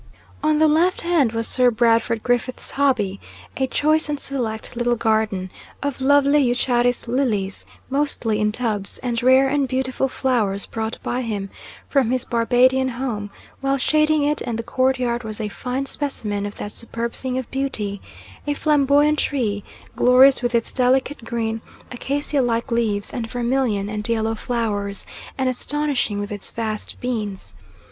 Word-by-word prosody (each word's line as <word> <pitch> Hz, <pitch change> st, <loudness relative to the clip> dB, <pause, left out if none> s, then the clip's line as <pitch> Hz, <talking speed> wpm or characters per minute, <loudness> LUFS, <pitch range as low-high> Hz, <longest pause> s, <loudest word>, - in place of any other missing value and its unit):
On 305 Hz, 0 st, +2 dB
the 315 Hz, +1 st, +5 dB
left 335 Hz, +5 st, +2 dB
hand 330 Hz, -9 st, +2 dB
was 230 Hz, 0 st, 0 dB
Sir 250 Hz, -1 st, +4 dB
Brandford 230 Hz, -1 st, +2 dB
Griffiths' 245 Hz, +1 st, 0 dB
hobby 240 Hz, -9 st, +1 dB, 0.4 s
a 265 Hz, -, 0 dB
choice 310 Hz, +3 st, +2 dB
and 295 Hz, -1 st, -2 dB
select 235 Hz, -7 st, -4 dB
little 240 Hz, 0 st, +1 dB
garden, 215 Hz, -5 st, 0 dB, 0.3 s
of 280 Hz, -2 st, -3 dB
lovely 285 Hz, +2 st, +4 dB
eucharis 245 Hz, 0 st, +1 dB
lilies 225 Hz, -6 st, -1 dB, 0.2 s
mostly 260 Hz, -6 st, 0 dB
in 210 Hz, 0 st, +2 dB
tubs, 210 Hz, -4 st, -2 dB
and 235 Hz, -2 st, -1 dB
rare 260 Hz, +2 st, +5 dB
and 280 Hz, 0 st, +1 dB
beautiful 260 Hz, +1 st, 0 dB
flowers 220 Hz, -7 st, 0 dB
brought 225 Hz, 0 st, -4 dB
by 250 Hz, -, -1 dB
him 205 Hz, -5 st, -4 dB, 0.4 s
from 270 Hz, -5 st, +2 dB
his 255 Hz, 0 st, +1 dB
Barbadian 255 Hz, +2 st, +3 dB
home; 235 Hz, -5 st, -4 dB, 0.3 s
while 275 Hz, 0 st, +1 dB
shading 305 Hz, +2 st, +2 dB
it 295 Hz, +1 st, 0 dB
and 235 Hz, -3 st, -3 dB
the 230 Hz, -, -3 dB
courtyard 255 Hz, -1 st, 0 dB
was 215 Hz, 0 st, -4 dB
a 215 Hz, -1 st, -2 dB
fine 255 Hz, +5 st, -3 dB
specimen 210 Hz, -9 st, -2 dB
of 205 Hz, -, -8 dB
that 205 Hz, -, -6 dB
superb 230 Hz, +1 st, -4 dB
thing 260 Hz, -1 st, -4 dB
of 260 Hz, -, -5 dB
beauty 215 Hz, -7 st, -2 dB, 0.5 s
a 290 Hz, -, 0 dB
flamboyant 295 Hz, 0 st, +3 dB
tree 215 Hz, -8 st, -1 dB, 0.3 s
glorious 255 Hz, +2 st, +6 dB
with 245 Hz, -1 st, 0 dB
its 230 Hz, -, 0 dB
delicate 260 Hz, +1 st, +1 dB
green 225 Hz, -1 st, -2 dB, 0.3 s
acacia 280 Hz, +3 st, 0 dB
like 235 Hz, 0 st, -1 dB
leaves 215 Hz, -4 st, 0 dB
and 230 Hz, -2 st, -3 dB
vermilion 240 Hz, -4 st, 0 dB
and 210 Hz, +2 st, -2 dB
yellow 225 Hz, -1 st, +1 dB
flowers, 210 Hz, -4 st, -2 dB, 0.3 s
and 265 Hz, -1 st, 0 dB
astonishing 255 Hz, -4 st, 0 dB
with 205 Hz, 0 st, -4 dB
its 205 Hz, -1 st, -3 dB
vast 220 Hz, -2 st, -4 dB
beans. 210 Hz, -, -4 dB
245 Hz, 155 wpm, -22 LUFS, 220-270 Hz, 0.5 s, glorious